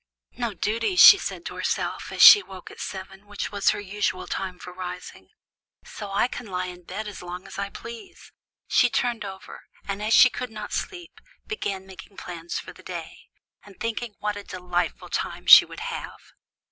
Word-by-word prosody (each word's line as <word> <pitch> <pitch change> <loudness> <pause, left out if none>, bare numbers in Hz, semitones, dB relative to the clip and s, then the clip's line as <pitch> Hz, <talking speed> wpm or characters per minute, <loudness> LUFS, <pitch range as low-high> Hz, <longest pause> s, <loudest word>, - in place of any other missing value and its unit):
"No 235 -4 -4
duties" 230 - -1
she 400 - +11
said - - -6
to - - -5
herself, - - -3
as - - +3
she 415 - +11
woke 190 - -11
at - - -14
seven, 195 +1 -8
which 205 -1 -5
was 200 -1 +2
her - - 0
usual 205 -2 -2
time 185 -2 -4
for 180 - -10
rising; 180 -1 -8 0.6
"so 205 -2 -8
I 200 +5 +2
can 245 - -8
lie 185 -1 -3
in 180 -1 -10
bed 210 +5 -6
as 205 - -8
long 180 +1 -8
as 195 - -9
I 200 0 -3
please." 235 - -11 0.4
She 245 - +4
turned 240 -1 -1
over, 195 0 -9 0.3
and 200 0 -4
as 215 +2 +3
she 255 - +8
could 250 - -5
not 215 -1 -8
sleep, 350 -3 -6 0.2
began 195 - -4
making 190 +1 -13
plans 170 -1 -6
for - - -8
the - - -16
day, - - -9 0.4
and 200 -2 -17
thinking 230 -1 -4
what 210 0 -2
a 205 - -7
delightful 180 -3 -3
time - - -4
she - - +10
would - - -10
have. - - -6
200 Hz, 190 wpm, -25 LUFS, 185-230 Hz, 0.6 s, she